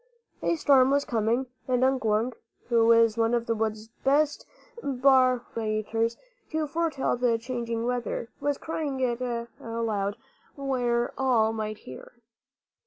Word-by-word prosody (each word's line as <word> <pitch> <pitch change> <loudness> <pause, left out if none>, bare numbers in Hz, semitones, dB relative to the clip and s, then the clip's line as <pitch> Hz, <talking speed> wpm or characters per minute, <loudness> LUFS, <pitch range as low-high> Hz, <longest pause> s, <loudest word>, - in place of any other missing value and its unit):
A - - +1
storm 270 -4 +5
was 280 +1 +2
coming; 230 +3 0 0.2
and 255 -1 +2
Unk 265 -1 +2
Wunk, 220 +3 +1 0.3
who 230 -1 +5
is 230 -1 +5
one 225 +1 +3
of 235 -1 -1
the 230 - +1
wood's 220 0 -3
best 290 +2 +2 0.3
barometers 240 - +1 0.3
to 315 -1 -1
foretell 310 -2 0
the 240 -2 +2
changing 235 -1 -3
weather, 245 -1 -2
was 285 0 0
crying 300 -4 -3
it 245 -1 0 0.4
aloud 220 -3 -2 0.4
where 245 -4 0
all 235 -4 +3
might 215 -1 -3
hear. 130 -9 -11
240 Hz, 130 wpm, -27 LUFS, 225-265 Hz, 0.4 s, storm